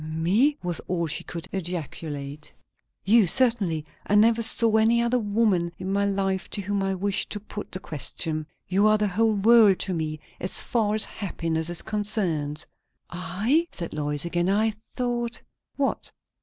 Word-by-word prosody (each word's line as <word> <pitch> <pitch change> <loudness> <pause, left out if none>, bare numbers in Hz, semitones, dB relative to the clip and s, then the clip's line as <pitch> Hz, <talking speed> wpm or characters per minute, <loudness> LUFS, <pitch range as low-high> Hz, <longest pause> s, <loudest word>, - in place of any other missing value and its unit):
"Me? 180 - +2
" - - -37
was 175 -2 -2
all 175 -2 0
she 155 - -1
could 170 +1 -6
ejaculate. 155 -5 -5 0.5
"You, 215 0 +5
certainly. 200 - +2 0.2
I 205 - +2
never 225 +2 +5
saw 225 0 +3
any 225 +2 +4
other 235 +1 +2
woman 205 -5 +1
in 190 +1 -3
my 200 0 +2
life 195 -1 -1
to 205 - -3
whom 200 0 -1
I 195 0 0
wished 200 +2 0
to 210 - -4
put 210 0 -8
the 185 - -5
question. 155 0 -3 0.2
You 195 +3 +3
are 215 0 +5
the 210 0 +1
whole 220 +3 +2
world 210 -1 +6
to 190 - 0
me, 155 -2 -3 0.2
as 185 - 0
far 215 -3 0
as 215 - +2
happiness 165 -5 -3
is 175 - -2
concerned." 175 -8 -1 0.5
"I? 205 - 0
" - - -44
said 170 -2 -5
Lois 150 0 0
again. 175 +1 0
"I 215 +3 +2 0.2
thought 240 -1 -1 0.2
" - - -55
"What?" 275 -1 -1
195 Hz, 175 wpm, -25 LUFS, 170-220 Hz, 0.5 s, world